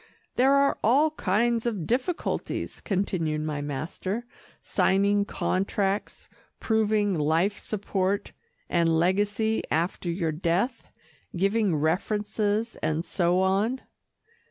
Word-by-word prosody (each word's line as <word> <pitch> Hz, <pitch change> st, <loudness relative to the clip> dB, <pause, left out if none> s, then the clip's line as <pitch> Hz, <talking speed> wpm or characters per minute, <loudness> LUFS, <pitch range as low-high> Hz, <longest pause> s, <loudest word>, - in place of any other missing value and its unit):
"There 270 Hz, +2 st, +4 dB
are 280 Hz, 0 st, +3 dB
all 285 Hz, +8 st, +4 dB
kinds 230 Hz, -1 st, +1 dB
of 205 Hz, -8 st, -2 dB
difficulties," 255 Hz, -, -2 dB
continued 175 Hz, -6 st, -1 dB
my 150 Hz, -1 st, -3 dB
master, 165 Hz, -, -4 dB, 0.3 s
"signing 200 Hz, +1 st, +2 dB
contracts, 195 Hz, 0 st, -1 dB, 0.3 s
proving 215 Hz, -2 st, +1 dB
life 165 Hz, +6 st, +1 dB
support 195 Hz, -1 st, -2 dB, 0.4 s
and 165 Hz, -2 st, +2 dB
legacy 205 Hz, +5 st, +1 dB
after 170 Hz, +2 st, -1 dB
your 170 Hz, -2 st, -1 dB
death, 180 Hz, -, -1 dB, 0.5 s
giving 195 Hz, 0 st, +2 dB
references 210 Hz, +7 st, 0 dB
and 155 Hz, +2 st, -1 dB
so 180 Hz, 0 st, +1 dB
on." 200 Hz, +7 st, +1 dB
200 Hz, 100 wpm, -26 LUFS, 170-220 Hz, 0.5 s, There